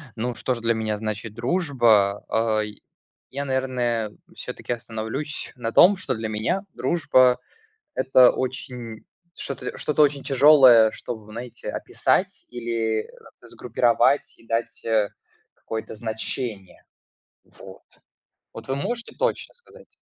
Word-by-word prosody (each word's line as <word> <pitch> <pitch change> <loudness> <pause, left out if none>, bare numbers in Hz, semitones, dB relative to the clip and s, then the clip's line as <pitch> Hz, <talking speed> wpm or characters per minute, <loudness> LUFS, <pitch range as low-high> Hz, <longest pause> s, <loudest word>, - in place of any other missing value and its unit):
Ну, 120 +1 -3
что 130 - -1
ж 115 - -8
для 115 0 +2
меня 110 -1 -2
значит 110 0 -5
дружба? 120 - +2
Ай, 110 -2 -1 0.5
я, 140 +2 -4
наверное, 125 -5 -1 0.2
всё-таки - - -5
остановлюсь 115 +6 -5
на 115 -2 -4
том, 190 +2 +6
что 140 -8 -2
для 110 0 -4
меня 110 - -1
дружба- 130 -6 +3 0.6
это 130 -1 +6
очень 125 -3 -5 0.3
что-то - - -6
что-то 150 0 +2
очень 140 -1 +2
тяжелое, 130 -5 +7
чтобы, 110 -3 -7
знаете, 120 +2 -7
описать - - -1
или, 115 -2 -1
э, - - -16 0.3
сгруппировать 120 +3 +1
и 115 - -21
дать, 115 +1 -3
э, 110 -3 +1 0.4
какое-то 110 0 -6
значение, 110 -2 -5 0.6
вот. - - -14 0.7
Вот - - -10
вы 135 - -1
можете 235 - -4
точно - - -1
сказать? 480 +1 -19
120 Hz, 120 wpm, -24 LUFS, 110-135 Hz, 0.7 s, тяжелое